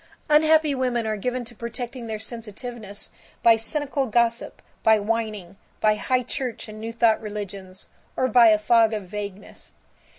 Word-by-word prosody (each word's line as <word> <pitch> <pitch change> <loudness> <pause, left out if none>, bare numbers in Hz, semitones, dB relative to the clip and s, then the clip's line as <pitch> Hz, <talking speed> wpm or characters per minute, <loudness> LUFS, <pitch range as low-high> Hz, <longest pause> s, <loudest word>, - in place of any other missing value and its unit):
Unhappy 310 0 +5
women 250 -3 -1
are 215 0 -1
given 250 +4 -3
to 240 - -11
protecting 235 +1 -6
their 220 -1 -3
sensitiveness 220 -1 -8 0.3
by 230 -1 +7
cynical 275 +4 -2
gossip, 235 +1 0 0.2
by 220 0 +5
whining, 210 -4 -3 0.2
by 215 0 +4
high 250 +5 0
church 250 -1 -4
and 215 0 -9
new 225 +1 -4
thought 230 -1 +3
religions, 200 -3 -7 0.3
or 255 - +2
by 240 -1 +6
a 215 -1 +6
fog 225 +1 +3
of 210 -2 -3
vagueness. 200 +1 -8
225 Hz, 155 wpm, -24 LUFS, 210-245 Hz, 0.3 s, by